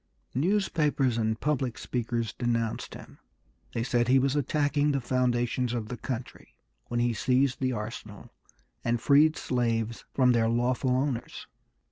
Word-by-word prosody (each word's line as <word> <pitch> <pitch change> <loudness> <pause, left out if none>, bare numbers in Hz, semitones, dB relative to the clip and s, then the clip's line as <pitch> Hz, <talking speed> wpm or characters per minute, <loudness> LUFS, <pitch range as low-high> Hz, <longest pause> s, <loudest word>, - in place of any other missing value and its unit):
Newspapers 150 - +1
and 110 0 0
public 135 -5 -1
speakers 115 -2 -2
denounced 115 -2 -2
him. - - -13 0.6
They 115 - 0
said 120 -1 +1
he 130 +1 +5
was 135 +1 +2
attacking 145 +1 +1
the 140 - +1
foundations 125 -1 0
of 115 -3 -3
the 125 - -4
country 125 0 -7 0.3
when 120 - -1
he 120 0 +2
seized 130 +3 +1
the 130 -1 0
arsenal 105 -2 -7 0.5
and 120 0 +1
freed 150 +5 +4
slaves 115 -2 -1
from 130 -2 +5
their 115 -2 +2
lawful 120 +2 +1
owners. 130 -1 -1
125 Hz, 140 wpm, -28 LUFS, 115-135 Hz, 0.6 s, he